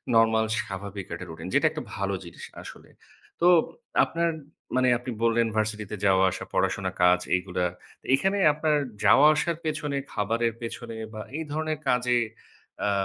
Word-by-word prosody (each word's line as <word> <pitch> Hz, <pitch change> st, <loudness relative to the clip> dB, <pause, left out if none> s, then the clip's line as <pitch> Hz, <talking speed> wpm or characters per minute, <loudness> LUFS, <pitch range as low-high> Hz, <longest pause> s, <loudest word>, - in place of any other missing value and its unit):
normal 110 Hz, 0 st, +4 dB, 0.2 s
স্বাভাবিক 100 Hz, -2 st, -6 dB
একটা 85 Hz, -, -6 dB
routine 80 Hz, -, -7 dB
যেটা -, -, +4 dB
একটা -, -, -5 dB
ভালো 100 Hz, 0 st, -1 dB
জিনিস 85 Hz, -, -10 dB, 0.2 s
আসলে। -, -, -11 dB, 0.5 s
তো -, -, +3 dB, 0.6 s
আপনার 170 Hz, 0 st, 0 dB, 0.5 s
মানে 130 Hz, 0 st, +3 dB
আপনি 125 Hz, +1 st, -6 dB
বললেন 115 Hz, 0 st, +3 dB
ভার্সিটিতে 105 Hz, -1 st, -2 dB
যাওয়া 95 Hz, -1 st, +4 dB
আসা, -, -, -5 dB
পড়াশোনা, 95 Hz, 0 st, 0 dB
কাজ 90 Hz, 0 st, +6 dB, 0.2 s
এইগুলা। 90 Hz, -1 st, -1 dB, 0.5 s
এখানে 195 Hz, +8 st, 0 dB, 0.2 s
আপনার 150 Hz, 0 st, +1 dB, 0.3 s
যাওয়া 145 Hz, +3 st, +7 dB
আসার 165 Hz, +2 st, 0 dB
পেছনে, 155 Hz, -2 st, -2 dB, 0.2 s
খাবারের 115 Hz, +2 st, 0 dB
পেছনে 115 Hz, 0 st, -6 dB, 0.2 s
বা 110 Hz, -, -6 dB, 0.2 s
এই 160 Hz, -, -3 dB
ধরনের 155 Hz, 0 st, -2 dB
কাজে 125 Hz, -1 st, +2 dB, 0.7 s
আ -, -, +2 dB
115 Hz, 145 wpm, -26 LUFS, 100-145 Hz, 0.7 s, যাওয়া